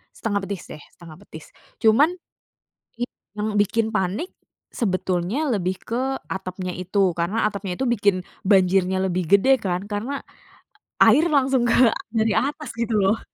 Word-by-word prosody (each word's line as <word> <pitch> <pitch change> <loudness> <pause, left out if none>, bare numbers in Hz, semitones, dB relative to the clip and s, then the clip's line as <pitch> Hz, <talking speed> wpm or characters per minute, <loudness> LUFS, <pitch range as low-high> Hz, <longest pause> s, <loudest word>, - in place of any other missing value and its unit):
Setengah 205 -3 -1
betis 200 -3 -5
deh, 150 - -10
setengah 165 -3 -12
betis. 160 - -13 0.3
Cuman 280 +11 +4 0.8
it 245 +1 -4 0.3
yang 210 +1 -2
bikin 220 +2 +1
panik, 210 - -2 0.4
sebetulnya 185 - -1
lebih 190 -4 -1
ke 260 +3 -2
atapnya 185 -1 -4
itu, 185 +2 0
karena 175 +6 -1
atapnya 200 -3 -2
itu 265 - -2
bikin 200 -6 +1 0.2
banjirnya 190 -1 +3
lebih 180 -3 -1
gede 260 +7 +4
kan, 180 -1 -2
karena 215 +7 -4 0.8
air 265 +10 +6
langsung 270 -5 +2
ke 235 0 +5 0.2
dari 220 -1 +2
atas 295 +3 -3
gitu 230 -1 -1
loh. 195 +4 +2
205 Hz, 140 wpm, -23 LUFS, 185-240 Hz, 0.8 s, air